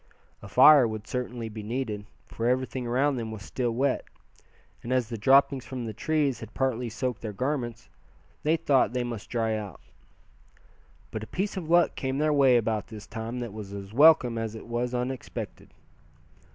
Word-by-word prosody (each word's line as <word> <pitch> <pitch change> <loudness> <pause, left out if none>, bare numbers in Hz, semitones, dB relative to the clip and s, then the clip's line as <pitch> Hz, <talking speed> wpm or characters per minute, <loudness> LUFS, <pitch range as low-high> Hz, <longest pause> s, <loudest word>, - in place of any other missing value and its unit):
A 100 - -9
fire 130 +4 +7
would 110 -1 -5
certainly 120 -1 -4
be 110 0 -7
needed, 105 -2 -4 0.2
for 115 - -3
everything 130 0 -1
around 135 +3 +1
them 115 -2 -4
was 105 -2 -7
still 125 +2 -2
wet; 130 +3 0 0.8
and 120 - -6
as 125 -3 +1
the 120 - -4
droppings 135 +4 +4
from 130 -2 -6
the 110 - -5
trees 145 +3 0
had 110 -1 -10
partly 125 -2 0
soaked 125 +1 -3
their 110 - -4
garments, 120 -1 -3 0.6
Thad 155 +2 +1
thought 135 -4 +3
they 125 -1 0
must 115 -3 -6
dry 115 -2 0
out. 100 -7 -6 1.3
But 110 - -4
a 110 - -7
piece 200 +3 -2
of 170 -4 -5
luck 175 0 +4
came 130 0 -2
their 150 +1 +2
way 135 -4 +5
about 110 -3 -1
this 110 -2 -10
time 115 +2 -5
that 120 -4 -5
was 105 -2 -8
as 100 0 -8
welcome 135 -4 +6
as 115 -1 -4
it 110 - -9
was 120 +1 -2
unexpected. 125 +1 -5
120 Hz, 180 wpm, -27 LUFS, 110-130 Hz, 1.3 s, fire